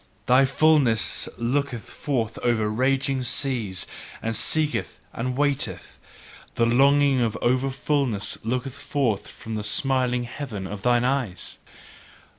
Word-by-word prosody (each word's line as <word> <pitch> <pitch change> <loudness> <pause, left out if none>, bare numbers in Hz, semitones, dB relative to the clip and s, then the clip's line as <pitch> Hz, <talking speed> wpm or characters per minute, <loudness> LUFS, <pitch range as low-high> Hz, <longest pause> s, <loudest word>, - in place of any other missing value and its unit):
Thy 130 +2 +5
fulness 135 -5 +3
looketh 125 -1 -1
forth 115 -6 -3
over 115 -3 +1
raging 130 +4 +1
seas, 120 - -1 0.3
and 115 0 -3
seeketh 155 +4 0
and 125 +2 -3
waiteth: 140 - -1 0.6
the 115 - +3
longing 135 +2 +4
of 115 -2 0
over 130 +2 +1
fulness 135 -6 -1
looketh 125 +3 -2
forth 140 -6 -1
from 110 - -9
the 105 -1 -3
smiling 125 +3 0
heaven 120 -5 -6
of 100 +1 -6
thine 120 +2 +3
eyes! 125 -9 -2
125 Hz, 120 wpm, -24 LUFS, 115-135 Hz, 0.6 s, Thy